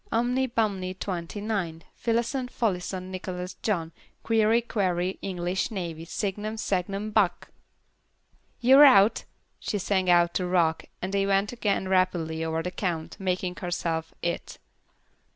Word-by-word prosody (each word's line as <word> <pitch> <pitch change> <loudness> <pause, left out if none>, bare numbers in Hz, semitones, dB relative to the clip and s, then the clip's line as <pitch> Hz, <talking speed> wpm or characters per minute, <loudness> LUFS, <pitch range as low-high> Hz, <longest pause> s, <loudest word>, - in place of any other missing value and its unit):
Umny 250 +3 +1
Bumny, 195 -5 -1
Twenty 185 0 -4
nine. 185 -7 -2
Fillason, 235 +2 -1
Folloson, 185 -5 -2
Nicholas 185 -1 -5
John. 170 -7 -1 0.3
Queevy, 225 +1 +3
Quavy, 185 -4 -1
English 180 0 -2
Navy, 170 -6 -5
Signum, 210 +4 -3
Sangnum, 200 +1 -2
Buck!' 190 -5 +1 1.1
"You're 265 +4 +8
out," 220 -6 +6 0.3
she 210 - -2
sang 190 -1 0
out 175 -1 +5
to 180 - -1
Rock 170 -3 +2 0.2
and 190 +2 -3
then 195 0 +2
went 195 +1 +2
again 205 -5 0
rapidly 175 -4 +1
over 160 0 -1
the 180 - -3
count, 175 -4 -3
making 185 -1 -2
herself 165 -2 -2
"It." 170 0 -3
185 Hz, 130 wpm, -27 LUFS, 175-215 Hz, 1.1 s, You're